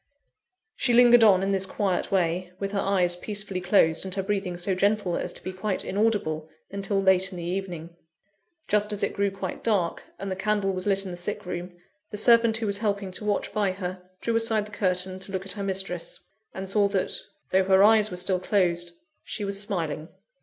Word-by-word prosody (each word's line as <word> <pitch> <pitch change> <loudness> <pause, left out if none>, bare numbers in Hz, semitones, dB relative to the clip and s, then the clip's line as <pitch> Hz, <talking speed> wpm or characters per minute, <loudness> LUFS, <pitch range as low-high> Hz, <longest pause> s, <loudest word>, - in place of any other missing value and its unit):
She 240 -2 +2
lingered 240 -1 +7
on 195 -3 +6
in 195 - 0
this 190 -1 +1
quiet 190 -2 -1
way, 180 -1 0
with 195 0 -3
her 200 - -1
eyes 185 -3 +2
peacefully 205 0 -3
closed, 175 -3 +3
and 190 0 -4
her 195 - -1
breathing 195 -3 -2
so 185 +2 -1
gentle 200 -1 +1
as - - -3
to - - -4
be 185 - -5
quite 190 +1 -2
inaudible, 190 -7 0 0.2
until 200 0 -1
late 190 -1 +4
in 185 - -8
the 170 - -5
evening. 175 -2 -4 0.7
Just 210 0 +2
as 205 - -1
it - - 0
grew 200 0 +1
quite 195 -1 -6
dark, 195 -7 0 0.2
and 195 -1 -5
the - - -1
candle 195 0 0
was 185 +1 -4
lit 195 -1 +1
in 185 - -5
the 175 - -6
sick 205 +3 -4
room, 175 0 -6 0.3
the 210 - -6
servant 230 0 +5
who 225 - -2
was 200 -1 -1
helping 200 -3 -1
to 195 +3 -6
watch 205 -1 -1
by 205 -3 +1
her, 185 -1 -5 0.2
drew 230 - -1
aside 225 -2 +2
the 210 - -12
curtain 185 -2 0
to 190 +1 -7
look 190 0 -3
at 195 - 0
her 205 - -4
mistress; 190 -3 -2 0.3
and 190 0 -6
saw 200 +1 +3
that, 195 -2 -1 0.4
though 190 0 +3
her 190 0 +5
eyes 215 0 +5
were 180 - -6
still 180 +1 +1
closed, 175 -3 +1 0.3
she 210 - -4
was 200 0 -1
smiling. 165 -5 -3
195 Hz, 210 wpm, -26 LUFS, 185-205 Hz, 0.7 s, lingered